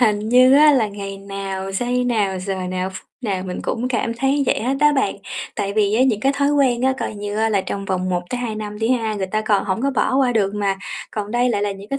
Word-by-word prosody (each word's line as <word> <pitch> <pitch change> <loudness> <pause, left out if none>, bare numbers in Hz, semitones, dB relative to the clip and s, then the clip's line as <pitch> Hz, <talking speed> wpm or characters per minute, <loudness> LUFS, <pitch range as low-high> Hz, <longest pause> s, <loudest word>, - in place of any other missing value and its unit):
Hình 215 -4 +3
như 255 +2 +6
á, 300 +1 +7
là 240 -6 +2
ngày 200 -1 -7
nào, 195 -1 -5
giây 245 +5 0
nào, 210 -6 0
giờ 190 +1 -3 0.2
nào, 185 +1 -2
ph - - -14 0.3
nào 200 -7 -2
mình 180 - -5
cũng 245 +2 -2
cảm 230 -2 -1
thấy 270 +4 +1
vậy - - +1
hết 260 +4 0
á 295 0 +5
bạn. 270 -8 0 0.4
Tại 200 0 -2
vì 210 -1 +2
á, 240 - +4
những 240 -6 +2
cái 270 +3 +2
thói 280 0 +2
quen 260 -4 +2
á, 265 +1 +3
coi - - -3
như 205 0 -5
á, 220 +1 +2
là 205 -3 +2
trong 195 +1 -4
vòng 185 -1 -1
1-2 220 +6 -2
năm 210 -1 -6
đi 225 - 0
ha, 225 -4 0
người 195 -2 -2
ta 215 +3 -1
còn 215 -2 +1
hổng 200 +3 -2
có 275 - +2
bỏ 260 0 0
qua 260 -2 +3
được 205 -3 +1
mà, 200 -2 0 0.3
còn 210 -1 -4
đây 240 +2 +2
lại 205 -4 0
là 205 -1 0
những 195 +1 -11
cái 275 - -2
215 Hz, 265 wpm, -20 LUFS, 195-250 Hz, 0.4 s, á